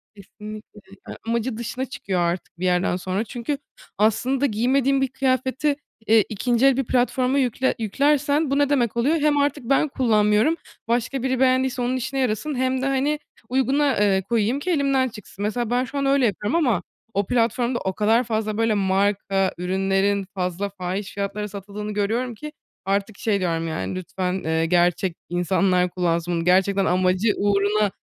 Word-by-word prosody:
Kesinlikle, 210 +1 -11 0.3
yani, - - -7
amacı 235 0 -1
dışına 245 +3 -4
çıkıyor 200 -8 -3
artık 170 0 -3
bir 185 - -2
yerden 180 0 +2
sonra 185 +3 -2
çünkü 240 +5 -4 0.4
aslında 245 +6 +2
giymediğim 270 +4 +2
bir 270 - +2
kıyafeti, 260 +2 0 0.3
eee, 220 -1 +6
2'nci 245 +4 +2
bir 270 - +1
platforma 255 +2 +1
yükle 260 0 +1
yüklersen 285 +6 +1
bu 275 - +2
ne 285 -1 +3
demek 240 -6 +1
oluyor? 275 +7 +2
Hem 295 0 +2
artık 285 -2 0
ben 275 +5 +2
kullanmıyorum, 220 +2 +2 0.3
başka 240 +2 -1
biri 260 -1 0
beğendiyse 260 -1 +2
onun 245 +1 0
işine 265 +2 -3
yarasın 260 +4 -1
hem 260 0 0
de, - - -1
hani, 275 +2 0 0.3
uyguna, 265 +2 +2
eee, 195 -2 +3
koyayım 235 +3 +1
ki 360 +5 -2
elimden 275 -4 +2
çıksın. 210 -3 -9
Mesela, 220 +2 -1
ben 245 +1 +1
şu 260 +3 -6
an 275 - 0
öyle 275 -1 +3
yapıyorum 210 - -1
ama 245 - +2 0.3
o 200 +1 0
platformda 240 +1 +1
o 190 - -2
kadar 220 +5 +2
fazla, 215 -2 -2
böyle, 225 -1 +2
marka 195 -1 +1
ürünlerin 195 +2 0
fazla 185 +1 -2
fahiş 190 +1 -5
fiyatlara 200 +1 -3
satıldığını 205 +1 -7
görüyorum 225 +4 -1
ki 300 +7 -8 0.3
artık 200 +1 -1
şey 210 -3 0
diyorum, 165 -3 -1
yani, 95 -12 -3
"Lütfen, 185 0 -3
eee, 160 +1 +1
gerçek 175 +1 +2
insanlar 180 +1 +1
kullansın 175 -1 -1
bunu." 165 -1 -1
Gerçekten 190 +2 +3
amacı 185 +4 +2
uğruna 205 0 +2
220 Hz, 165 wpm, -23 LUFS, 195-260 Hz, 0.4 s, eee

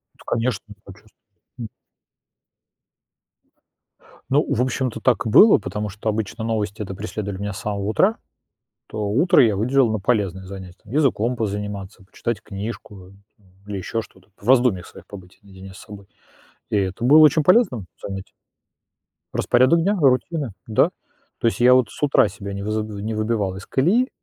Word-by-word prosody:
Да, - - -19
конечно. 115 -2 -1 0.3
Сочувствуют. 105 +2 -16 0.4
Мгм. 115 -2 -6 2.6
Ну, 145 +3 +3
в 120 - +1
общем-то, 125 -2 -2
так 120 -6 +2
и - - -1
было, 205 - +7
потому 105 +1 -5
что 105 +3 -4
обычно 110 0 -3
новости-то 105 -3 -3
преследовали 100 -1 -5
меня 105 -1 -3
с - - -7
самого 105 -3 -3
утра. 190 - +2 0.7
То 110 - -7
утро 150 - +4
я 110 -4 +2
выделил 125 +3 +2
на 110 - -1
полезное 95 -3 -1
занятие: 95 -1 -10
там, 105 - -12
языком 125 -5 +1
позаниматься, 105 -2 -5
почитать 105 +2 -4
книжку, 100 -2 -8
э, - - -17 0.3
там 100 - -28 0.2
или 100 -1 -4
ещё 115 +4 -3
что-то, 95 -3 -19
по 100 - -18
в - - -3
раздумьях 120 -9 +3
своих - - -15
побыть 95 -3 -13
наедине 95 -1 -13
с 95 - -13
собой. 105 -2 -12 0.6
И 105 - 0
это 95 +3 -2
было 145 +6 +7
очень 155 0 +6
полезным 165 - +3 0.2
занятием. 95 -1 -7 1.0
Распорядок 130 +7 +3
дня, 200 +4 +1
рутины, 140 - +1
да, 110 - +2 0.5
то - - +1
есть 115 - -1
я 125 +1 +6
вот 125 -5 +3
с - - -9
утра 140 -6 +4
себя 100 0 -8
не 100 - -5
выз 105 +2 -2 0.2
не 110 +1 -3
выбивал 105 -3 -1
из 95 - -9
колеи, 210 - +2
110 Hz, 165 wpm, -22 LUFS, 100-125 Hz, 2.6 s, было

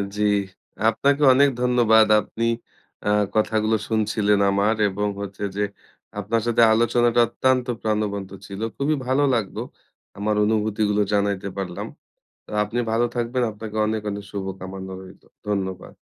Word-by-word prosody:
জ্বি, 105 0 +1 0.6
আপনাকে 140 +6 +1
অনেক 140 +2 +5
ধন্যবাদ। 115 -3 +4
আপনি 115 +2 -4 0.6
আ - - +3 0.3
কথাগুলো 110 0 +2
শুনছিলেন 105 -2 +1
আমার 100 +3 +2
এবং 105 +2 -2
হচ্ছে 100 0 -6
যে 105 - 0 0.6
আপনার 110 +3 0
সাথে 120 0 +3
আলোচনাটা 120 +1 +2
অত্যন্ত 130 +2 +1
প্রাণবন্ত 105 -3 -2
ছিল। 100 +2 -8 0.2
খুবই 145 +3 +1
ভালো 130 +3 +2
লাগলো 110 -5 -2 0.6
আমার 105 +1 0
অনুভূতিগুলো 105 -1 +1
জানাইতে 100 -1 0
পারলাম। 90 -3 -4 0.6
তো - - -15
আপনি 105 +4 -4
ভালো 120 +2 +2
থাকবেন, 120 +1 -1
আপনাকে 105 +1 -8
অনেক, 110 0 -1
অনেক 100 0 -6
শুভ 100 -1 -4 0.2
কামনা 95 0 -7
রইলো। 95 0 -14 0.2
ধন্যবাদ। 95 -3 -3
110 Hz, 135 wpm, -23 LUFS, 100-115 Hz, 0.6 s, অনেক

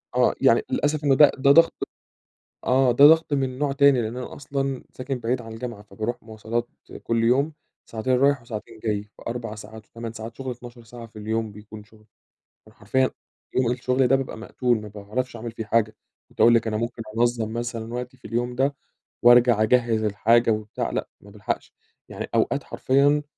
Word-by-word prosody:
آه. - - +3
يعني - - +5
للأسف 150 +1 0
إنه 135 -2 +4
ده 150 0 +7
ده 140 +1 +4
ضغْط 165 +3 +6 0.9
آه. 130 -1 +3
ده 140 +4 +6
ضغْط 160 -1 +5
من 135 -2 -1
نوع 145 -1 0
تاني، 140 -3 +4
لإن 110 +2 -4
أنا 125 - -6
أصلًا 135 -2 -3
ساكن 130 0 -4
بعيد 120 +1 -2
عن 115 -1 -9
الجامعة، 115 -2 -7
فباروح 110 +4 -4
مواصلات 115 +2 -4 0.3
كل 115 0 0
يوم 140 +6 +2 0.3
ساعتين 115 +3 -2
رايح 140 0 +3
وساعتين 110 -1 -8
جاي 105 -2 -2
في 105 - -19
4 115 -2 -4
ساعات 110 +1 -11
و8 115 -1 -7
ساعات 110 +1 -8
شُغل 130 -1 -5
12 120 0 -10
ساعة 115 0 -10
في 110 -1 -14
اليوم 110 0 -2
بيكون 105 0 -12
شُغل، 110 0 -22 0.6
فأنا 110 - -20
حرفيًا 130 +5 +1 0.5
يوم 125 -2 +2
الشُغل 125 +1 +1
ده 135 - +4
بابقى 135 -4 -3
مقتول، 120 0 -1
ما 105 - -8
باعرفش 105 +5 -5
أعمل 115 0 -6
فيه 110 -1 -6
حاجة. 110 -1 +1 0.3
كنت - - -5
هاقول 120 - +7
لِك 115 - +1
أنا 110 -1 -1
ممكن 115 +1 -4 0.2
أنظَّم 115 -2 +1
مثلًا 115 -1 -4
وقتي 125 +1 -6
في - - -21
اليوم 120 +1 -2
ده 140 +2 +1 0.5
وأرجع 120 -2 +6
أجهِّز 115 -1 +2
الحاجة 115 +3 +3
وبتاع 105 -1 -3
لأ، - - -3
ما 100 - -15
بالحقش. 105 0 -4 0.4
يعني - - -6
أوقات - - +1
حرفيًا 145 +3 +2
120 Hz, 185 wpm, -24 LUFS, 110-130 Hz, 0.9 s, ده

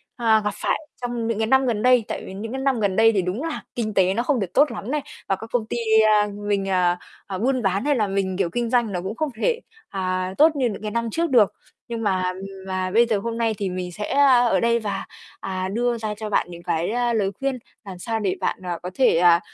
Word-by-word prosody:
à, 225 -3 +3
gặp 210 -1 -1
phải - - -1 0.2
trong 240 -2 -2
những 230 -2 -1
cái 220 0 0
năm 265 +1 +4
gần 220 -4 0
đây. 250 -3 +4
Tại - - -4
vì 190 - -8
những 220 +4 -6
cái 265 0 -3
năm 270 -4 +1
gần 200 -3 +1
đây 225 0 +6
thì 195 -3 +1
đúng 185 - -3
là 325 -2 -3
kinh 215 -3 -2
tế 190 -1 +3
nó 235 +3 0
không 265 -3 +1
được 180 -3 -4
tốt 285 -2 +4
lắm 215 +3 -5
này, 300 -1 0 0.3
và 195 - +3
các 225 +4 -10
công 230 -3 +1
ty 240 - -4 0.3
a, 210 -1 +4 0.2
mình, 200 -1 0
à, 180 -1 +2 0.3
à, 190 -2 -4
buôn 255 +4 +1
bán 195 +5 0
hay 290 -1 +3
là 215 -4 +1
mình, 195 -1 -1
kiểu, 185 -4 +1
kinh 235 +4 -2
doanh 240 -4 +2
nó 180 -2 -2
cũng 195 +4 -5
không 310 +1 -1
thể, 475 -1 +2 0.3
à, 185 -1 -2
tốt 310 +1 +5
như 255 -4 +1
những 205 - -6
cái 210 -1 -4
năm 235 0 -1
trước 335 -1 0
được. 230 -6 +4 0.3
Nhưng 230 -1 -4
mà, 190 -3 +1
ừm, 190 +1 -8 0.2
mà 185 0 -2
bây 235 +3 +5
giờ 220 -3 +1
hôm 230 +2 -4
nay 225 -1 +1
thì 195 -2 -2
mình 180 -1 -4
sẽ, 210 +4 -5
a, 270 -3 +6
ở - - +3
đây 235 0 +2
và, 200 -3 -3 0.3
à, 185 -1 -3
đưa 240 +1 0
ra 215 -1 -3
cho 215 -1 -5
bạn - - +1
những 170 0 -10
cái, 165 +5 -1
a, 240 0 +1
lời 200 -3 +1
khuyên 270 -2 -1 0.3
làm 190 -2 -8
sao 225 +3 -2
để 195 -3 0
bạn, - - -1
à, 175 -1 -2
có 180 - -4
thể, 255 -10 +3
à, 170 -1 +6
220 Hz, 270 wpm, -23 LUFS, 190-240 Hz, 0.3 s, đây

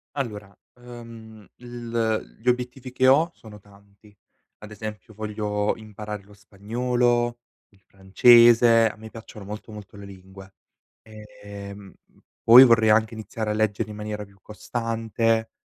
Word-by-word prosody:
Allora, 105 -7 -6 0.3
uhm, 115 -3 -13
il 120 -2 -4
gli 125 - -4
obiettivi 125 +1 -2
che 130 +1 +1
ho 155 +6 +4
sono 105 -2 -15
tanti. 100 +1 -22 0.4
Ad 105 0 -12
esempio 105 0 -9
voglio 105 -1 -3
imparare 105 -2 -9
lo 105 0 -19
spagnolo, 120 +4 -1 0.3
il 100 -1 -29
francese, 115 +3 +5
a - - -11
me 110 0 -11
piacciono 110 -2 -12
molto, 105 +2 -9
molto 105 -1 -12
le 100 0 -11
lingue. 95 0 -14 0.5
Ehm, 100 -2 -12
m - - -30 0.2
poi 120 +3 +9
vorrei 115 -3 +4
anche 110 +1 +2
iniziare 110 0 -5
a - - +1
leggere 110 0 -1
in 105 - -9
maniera 105 0 -6
più 100 0 -23
costante, 115 +1 -2
110 Hz, 140 wpm, -23 LUFS, 105-115 Hz, 0.5 s, poi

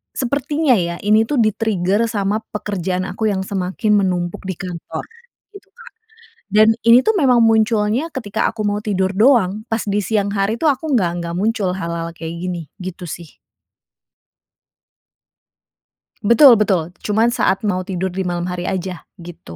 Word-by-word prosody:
sepertinya 285 +2 0
ya 170 -4 0
ini 215 +1 +5
tuh 290 - 0
di-trigger 215 -1 +1
sama 205 0 -1
pekerjaan 185 -3 -3
aku 215 +4 -2
yang 190 -1 -2
semakin 195 +3 -2
menumpuk 175 -2 -2
di 185 - -3
kantor 180 -3 -6 0.5
gitu, 400 0 -14
Kak. 480 +3 -15 0.7
Dan 215 +1 +6 0.2
ini 235 +2 +7
tuh, 440 +4 +1
memang 250 -6 +4
munculnya 225 +5 +2
ketika 220 -7 -2
aku 225 -1 -6
mau 205 0 0
tidur 190 -3 -1
doang. 215 -4 +3
Pas 225 -1 -2
di 205 0 -1
siang 205 0 0
hari 195 +3 +1
tuh 315 - +4
aku 285 +2 -1
nggak 180 -8 +2
nggak 170 0 -5
muncul 210 -3 0
hal-hal 170 -2 -4
kayak 165 0 -7
gini, 175 -1 -4 0.2
gitu 180 -2 -7
sih. 170 0 -9 2.9
Betul, 250 +3 +8
betul. 185 -6 +1 0.2
Cuman 220 +3 +2
saat 190 - +2
mau 185 -1 -1
tidur 190 0 -2
di 190 - 0
malam 175 0 -2
hari 180 0 -4
aja, 185 0 -4 0.3
gitu. 85 - -11
205 Hz, 155 wpm, -19 LUFS, 180-230 Hz, 2.9 s, Betul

